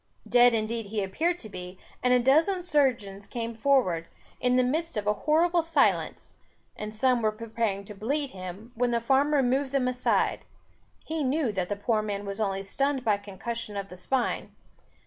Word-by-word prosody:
Dead 245 -1 +6
indeed 225 0 -2
he 210 0 -2
appeared 325 - 0
to 225 - -8
be, 180 -2 -8 0.2
and 250 - +2
a 250 - +6
dozen 320 +9 +3
surgeons 245 - 0
came 230 -1 -4
forward, 220 -10 +2 0.3
in 250 0 +2
the 255 - +4
midst 315 +3 -1
of 205 - -2
a 210 - +3
horrible 335 +8 +2
silence, 325 -3 0 0.4
and 215 0 -6
some 250 +1 +2
were 215 -1 +2
preparing 220 -2 -3
to 210 - -8
bleed 275 +8 -2
him, 185 +5 -8
when 245 0 +1
the 235 -1 +1
farmer 275 +4 +3
moved 265 +2 +1
them 270 -2 +1
aside; 250 0 +1 0.6
he 315 -1 -2
knew 270 -2 +1
that 185 -3 -2
the 205 - -1
poor 215 +2 0
man 205 -1 -4
was 200 +2 -4
only 195 -2 -1
stunned 270 +6 -1
by 215 -2 +4
concussion 205 +2 -6
of 200 0 -4
the 180 - -9
spine. 240 +8 -2
235 Hz, 185 wpm, -27 LUFS, 205-270 Hz, 0.6 s, Dead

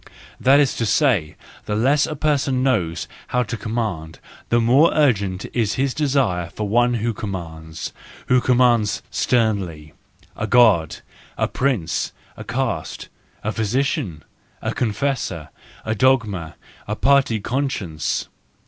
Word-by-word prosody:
That 135 +2 +5
is 145 -3 +2
to 115 - 0
say, 105 - +2 0.3
the 105 - -2
less 135 +7 +3
a 155 - -4
person 140 -3 +1
knows 85 -11 0 0.2
how 125 -1 +1
to 120 - -5
command, 105 -8 -3 0.3
the 120 - +3
more 130 +8 +5
urgent 100 -11 +1
is 110 -4 0
his 135 -1 0
desire 130 - 0
for 105 +4 -4
one 120 +3 +3
who 115 +1 -1
commands, 85 -7 -6 0.3
who 125 0 +3
commands 120 -5 +2
sternly,—a 95 - -2
God, 95 -12 +4 0.4
a - - +1
prince, 120 - -1 0.2
a 110 - -8
caste, 120 -7 -3 0.3
a 110 - -1
physician, 110 - -1 0.4
a - - -3
confessor, 110 - -2 0.4
a 110 - 0
dogma, 105 - +1 0.3
a 105 - -2
party 135 -2 +3
conscience. 105 - -2
115 Hz, 125 wpm, -21 LUFS, 90-130 Hz, 0.4 s, That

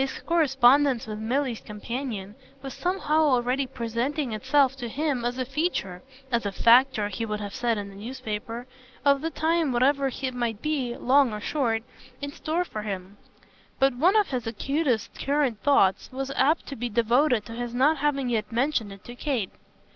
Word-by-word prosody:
His 270 - -2
correspondence 275 -5 +4
with 215 -1 -6
Milly's 245 +1 -1
companion 210 -2 -5 0.3
was 270 -2 -6
somehow 355 -4 0
already 260 -2 +2
presenting 245 +4 -2
itself 270 +4 +2
to 240 -3 -5
him 280 -1 -1
as 245 +1 -2
a 255 - -1
feature 265 - -2 0.3
as 235 -1 +1
a 200 - -2
factor, 235 0 +4
he 210 +3 -4
would 210 -2 -3
have 205 -1 -6
said 240 -3 0
in 200 -1 -5
his 195 - -12
newspaper 230 0 -5 0.4
of 280 -1 +4
the 325 - -1
time 325 -2 +1
whatever 270 +3 +2
it 260 0 -4
might 235 -4 -2
be, 270 -4 -2
long 265 0 +4
or 210 - -4
short, 230 -3 -1 0.4
in 285 0 -5
store 330 +3 -2
for 215 - -6
him; 195 -1 -6 0.6
but 270 0 +3
one 345 - +3
of 425 -2 +3
his 245 -4 -3
acutest 245 0 -1
current 275 -6 0
thoughts 235 -10 +3
was 270 +1 -4
apt 290 +4 +2
to 280 - -7
be 245 0 -3
devoted 235 +2 +2
to - - -10
his 240 0 -4
not 290 +5 +4
having 275 -2 0
yet 225 -3 -1
mentioned 235 -3 0
it 195 -1 -12
to 240 - -9
Kate. 245 -6 -2
250 Hz, 180 wpm, -26 LUFS, 225-280 Hz, 0.6 s, correspondence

